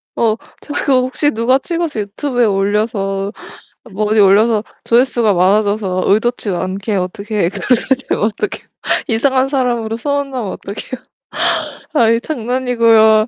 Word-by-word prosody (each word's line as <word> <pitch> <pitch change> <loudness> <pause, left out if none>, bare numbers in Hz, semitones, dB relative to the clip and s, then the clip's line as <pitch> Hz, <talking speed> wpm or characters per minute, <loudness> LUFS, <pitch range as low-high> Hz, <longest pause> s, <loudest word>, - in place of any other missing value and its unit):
어 220 -2 +2 0.3
저 290 - -8
그거 260 -3 +2
혹시 260 +3 +1
누가 235 +4 +2
찍어서 330 -8 -2
유튜브에 245 +4 -1
올려서 200 -1 0 0.6
뭐 210 +2 -1
어디 215 0 +3
올려서 210 +2 +4 0.2
조회수가 235 -3 +3
많아져서 195 0 +1
의도치 220 +1 +1
않게 190 +3 -2
어떻게 200 0 -1
그렇게 245 +5 0 0.2
되면 - - 0
어떻게 225 - -2
해요? - - -34 0.4
이상한 260 +3 +2
사람으로 240 -5 -1
소문나면 275 -5 -2
어떡해요. 210 +5 -7 0.9
아이 230 -5 +3
장난이고요. 230 -4 +3
225 Hz, 325 characters per minute, -16 LUFS, 205-255 Hz, 0.9 s, 올려서